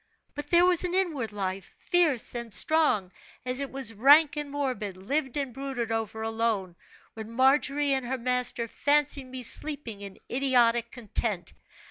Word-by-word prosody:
But 290 Hz, 0 st, -6 dB
there 345 Hz, +3 st, +5 dB
was 360 Hz, -1 st, +3 dB
an 360 Hz, 0 st, -2 dB
inward 310 Hz, -, -1 dB
life, 190 Hz, -2 st, -5 dB
fierce 335 Hz, -9 st, +1 dB
and 235 Hz, -2 st, -6 dB
strong, 295 Hz, -, +2 dB, 0.3 s
as 255 Hz, +1 st, +1 dB
it 280 Hz, -1 st, -4 dB
was 265 Hz, -4 st, -2 dB
rank 285 Hz, +8 st, +5 dB
and 295 Hz, -1 st, -4 dB
morbid, 255 Hz, -9 st, -3 dB
lived 265 Hz, +7 st, -2 dB
and 275 Hz, -4 st, -3 dB
brooded 265 Hz, -3 st, -4 dB
over 220 Hz, 0 st, -3 dB
alone, 225 Hz, -5 st, -2 dB, 0.4 s
when 220 Hz, -1 st, -8 dB
Margery 275 Hz, +3 st, +2 dB
and 265 Hz, -2 st, -2 dB
her 260 Hz, +2 st, -2 dB
master 250 Hz, -1 st, -1 dB
fancied 290 Hz, +2 st, +1 dB
me 255 Hz, 0 st, -7 dB
sleeping 245 Hz, -5 st, 0 dB
in 200 Hz, -1 st, -9 dB
idiotic 240 Hz, -3 st, +2 dB
content. 215 Hz, -6 st, -3 dB
255 Hz, 155 wpm, -27 LUFS, 225-285 Hz, 0.4 s, there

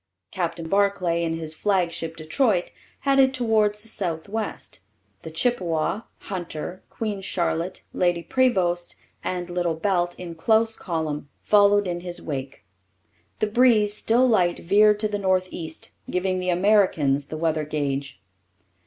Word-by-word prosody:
Captain 170 Hz, -3 st, -3 dB
Barclay 195 Hz, -3 st, +1 dB
in 165 Hz, -1 st, -1 dB
his 160 Hz, -1 st, -3 dB
flagship 170 Hz, -3 st, -1 dB
Detroit 180 Hz, -, +1 dB, 0.3 s
headed 270 Hz, -1 st, +4 dB
towards 215 Hz, -4 st, +2 dB
the -, -, -8 dB
south 175 Hz, -7 st, -2 dB
west. 220 Hz, +2 st, -5 dB, 0.4 s
The 160 Hz, -, -7 dB
Chippewa, 170 Hz, 0 st, 0 dB, 0.2 s
Hunter, 175 Hz, -1 st, -6 dB
Queen 210 Hz, -3 st, -4 dB
Charlotte, 175 Hz, -1 st, -2 dB
Lady 175 Hz, -1 st, +1 dB
Prevost, 185 Hz, -10 st, +1 dB, 0.3 s
and 180 Hz, -1 st, -3 dB
Little 175 Hz, -2 st, -1 dB
Belt, 175 Hz, 0 st, 0 dB
in 175 Hz, -2 st, -7 dB
close 220 Hz, +6 st, +2 dB
column, 155 Hz, -4 st, -3 dB
followed 205 Hz, -1 st, +4 dB
in 175 Hz, -1 st, -2 dB
his 175 Hz, 0 st, -6 dB
wake. 135 Hz, -7 st, -6 dB, 0.7 s
The -, -, +1 dB
breeze, 215 Hz, -2 st, +4 dB
still 235 Hz, +4 st, +3 dB
light, 180 Hz, -7 st, +3 dB
veered 210 Hz, +3 st, +4 dB
to 215 Hz, -, +2 dB
the 205 Hz, -1 st, -3 dB
north 185 Hz, -1 st, +1 dB
east, 160 Hz, -2 st, -7 dB, 0.2 s
giving 185 Hz, 0 st, 0 dB
the 180 Hz, 0 st, -2 dB
Americans 175 Hz, -7 st, +3 dB
the 155 Hz, -, -6 dB
weather 160 Hz, -1 st, 0 dB
gauge. 140 Hz, -4 st, -3 dB
180 Hz, 135 wpm, -24 LUFS, 165-210 Hz, 0.7 s, headed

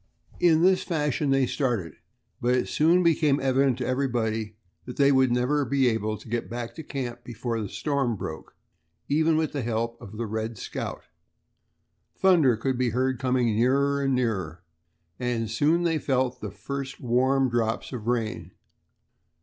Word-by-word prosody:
In 165 Hz, -2 st, +4 dB
this 185 Hz, 0 st, +4 dB
fashion 150 Hz, -4 st, -1 dB
they 135 Hz, -1 st, +3 dB
started, 115 Hz, -, -1 dB, 0.5 s
but 125 Hz, +1 st, +2 dB
it 125 Hz, -, 0 dB
soon 170 Hz, +4 st, +3 dB
became 155 Hz, -4 st, +3 dB
evident 135 Hz, -1 st, +2 dB
to 125 Hz, -, -3 dB
everybody 115 Hz, -5 st, -1 dB, 0.3 s
that 125 Hz, -, -8 dB
they 140 Hz, 0 st, +5 dB
would 130 Hz, -2 st, +4 dB
never 125 Hz, +4 st, +1 dB
be 135 Hz, 0 st, +2 dB
able 110 Hz, -1 st, -1 dB
to -, -, -15 dB
get 120 Hz, +1 st, -3 dB
back 120 Hz, 0 st, -5 dB
to 160 Hz, -, -8 dB
camp 120 Hz, -4 st, -5 dB
before 115 Hz, -1 st, -4 dB
the 105 Hz, -, -4 dB
storm 140 Hz, -6 st, -1 dB
broke, 80 Hz, -5 st, -7 dB, 0.5 s
even 155 Hz, +2 st, +2 dB
with 160 Hz, -1 st, 0 dB
the 145 Hz, -, -3 dB
help 115 Hz, 0 st, -2 dB
of 105 Hz, +2 st, -10 dB
the 115 Hz, -, -2 dB
"Red 110 Hz, +1 st, -4 dB
Scout." -, -, -5 dB, 1.1 s
Thunder 165 Hz, -11 st, +4 dB
could 130 Hz, +2 st, -1 dB
be 125 Hz, -1 st, +2 dB
heard 130 Hz, +2 st, 0 dB
coming 125 Hz, -3 st, +1 dB
nearer 140 Hz, +4 st, +2 dB
and 135 Hz, -1 st, +1 dB
nearer, 95 Hz, -9 st, -2 dB, 0.6 s
and 115 Hz, -3 st, -2 dB
soon 155 Hz, +9 st, +2 dB
they 165 Hz, -2 st, +1 dB
felt 130 Hz, -3 st, 0 dB
the -, -, -4 dB
first 140 Hz, -1 st, -6 dB
warm 130 Hz, +2 st, +2 dB
drops 120 Hz, 0 st, -1 dB
of 115 Hz, -3 st, -6 dB
rain. 115 Hz, -3 st, -2 dB
125 Hz, 165 wpm, -26 LUFS, 115-140 Hz, 1.1 s, they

